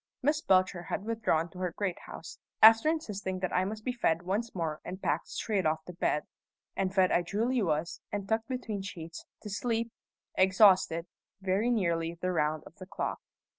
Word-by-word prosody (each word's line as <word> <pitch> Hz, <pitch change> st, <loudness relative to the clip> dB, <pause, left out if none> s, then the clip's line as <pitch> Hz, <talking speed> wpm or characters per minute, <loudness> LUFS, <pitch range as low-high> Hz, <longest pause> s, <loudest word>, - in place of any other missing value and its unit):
Miss 300 Hz, +3 st, +2 dB
Belcher 185 Hz, -, +3 dB
had 195 Hz, +3 st, -4 dB
withdrawn 220 Hz, -8 st, +1 dB
to 180 Hz, -, -11 dB
her 180 Hz, -2 st, -2 dB
great 195 Hz, -4 st, -1 dB
house, -, -, -9 dB, 0.2 s
after 225 Hz, +6 st, +8 dB
insisting 205 Hz, -, -2 dB
that 185 Hz, -, -2 dB
I 185 Hz, -, +2 dB
must 215 Hz, +2 st, -5 dB
be 255 Hz, -, +1 dB
fed 175 Hz, -8 st, +1 dB
once 205 Hz, +6 st, -2 dB
more 160 Hz, -3 st, -2 dB
and 185 Hz, -, -6 dB
packed 155 Hz, -3 st, -1 dB
straight 205 Hz, -4 st, -1 dB
off 155 Hz, 0 st, 0 dB
to 180 Hz, -, -8 dB
bed; 150 Hz, -3 st, 0 dB, 0.5 s
and 190 Hz, -1 st, 0 dB
fed 190 Hz, -1 st, +3 dB
I 175 Hz, -, +4 dB
duly 225 Hz, +8 st, 0 dB
was, 160 Hz, -2 st, -1 dB
and 200 Hz, -1 st, -3 dB
tucked 220 Hz, +1 st, 0 dB
between 240 Hz, -6 st, -3 dB
sheets, 170 Hz, -4 st, -8 dB, 0.2 s
to 210 Hz, -, -6 dB
sleep, 230 Hz, +2 st, -1 dB, 0.4 s
exhausted, 185 Hz, -3 st, +5 dB, 0.3 s
very 195 Hz, +4 st, +1 dB
nearly 170 Hz, -7 st, 0 dB
the 185 Hz, +1 st, -1 dB
round 155 Hz, -2 st, 0 dB
of -, -, -15 dB
the 185 Hz, -2 st, -10 dB
clock. 200 Hz, -, -3 dB
190 Hz, 185 wpm, -30 LUFS, 170-220 Hz, 0.5 s, after